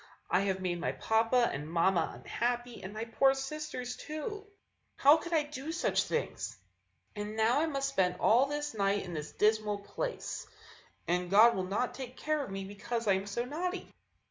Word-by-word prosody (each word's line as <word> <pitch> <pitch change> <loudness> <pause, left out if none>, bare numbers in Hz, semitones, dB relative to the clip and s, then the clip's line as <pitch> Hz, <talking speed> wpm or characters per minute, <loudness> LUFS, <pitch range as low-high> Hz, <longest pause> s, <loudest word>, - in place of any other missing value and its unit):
I - - +5
have 190 -1 0
made 175 -1 -1
my 165 - -1
papa 230 +2 +2
and 145 +2 -5
mamma 170 0 +2
unhappy, 240 0 -2
and 190 - -7
my 215 +2 -4
poor 270 +4 +3
sisters, 270 -3 -4
too! 405 +8 -6 0.5
How 290 +3 +7
could 340 +2 -7
I 320 -3 +3
do 295 +1 -6
such 350 - +1
things? 470 - -3 0.6
And 210 +1 -5
now 225 +5 +4
I 325 - +2
must 275 -3 -1
spend 185 -8 +1
all 245 +5 +5
this 295 -1 -3
night 200 -1 +1
in 175 - -7
this 150 -2 -5
dismal 215 -1 +2
place; 485 - -4 0.6
and 180 +1 0
God 220 +5 +7
will 185 -1 -1
not 225 +6 -1
take 255 0 -8
care 305 -1 0
of - - -7
me 195 0 -4
because 210 +4 -4
I 200 - +6
am 190 +1 -1
so 235 +4 -2
naughty." 355 +8 -4
235 Hz, 185 wpm, -32 LUFS, 195-280 Hz, 0.6 s, How